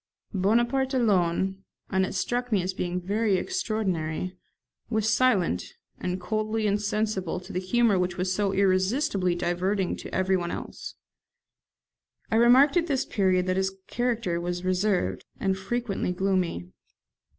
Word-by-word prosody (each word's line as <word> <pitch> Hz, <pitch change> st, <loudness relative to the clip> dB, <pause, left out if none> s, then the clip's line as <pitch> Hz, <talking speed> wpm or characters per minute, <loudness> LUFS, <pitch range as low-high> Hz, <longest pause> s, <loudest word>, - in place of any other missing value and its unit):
Bonaparte 240 Hz, +7 st, +2 dB
alone 190 Hz, -4 st, +1 dB, 0.3 s
(and 190 Hz, -1 st, +2 dB
it -, -, -6 dB
struck 245 Hz, +6 st, -1 dB
me 200 Hz, -4 st, +2 dB
as 185 Hz, +1 st, -2 dB
being 180 Hz, -1 st, -2 dB
very 205 Hz, +3 st, +1 dB
extraordinary) 185 Hz, -, -2 dB, 0.5 s
was 220 Hz, -2 st, 0 dB
silent, 195 Hz, -, +2 dB, 0.4 s
and 180 Hz, +1 st, -2 dB
coldly 215 Hz, +4 st, -1 dB
insensible 210 Hz, -3 st, -1 dB
to 180 Hz, -, -11 dB
the 180 Hz, -, 0 dB
humour 205 Hz, +1 st, +2 dB
which 180 Hz, 0 st, -1 dB
was 185 Hz, 0 st, 0 dB
so 200 Hz, 0 st, +1 dB
irresistibly 190 Hz, 0 st, +1 dB
diverting 180 Hz, +2 st, 0 dB
to -, -, -9 dB
everyone 185 Hz, -2 st, +1 dB
else. -, -, -7 dB, 1.4 s
I 225 Hz, -, +3 dB
remarked 255 Hz, +7 st, +6 dB
at 340 Hz, -1 st, +2 dB
this 275 Hz, -5 st, 0 dB
period 185 Hz, -3 st, +1 dB
that 185 Hz, 0 st, 0 dB
his 190 Hz, 0 st, 0 dB
character 230 Hz, -8 st, -1 dB
was 175 Hz, +1 st, -3 dB
reserved, 185 Hz, +1 st, 0 dB, 0.2 s
and 190 Hz, -1 st, +1 dB
frequently 200 Hz, -1 st, -2 dB
gloomy. 180 Hz, -, -1 dB
190 Hz, 135 wpm, -27 LUFS, 180-220 Hz, 1.4 s, remarked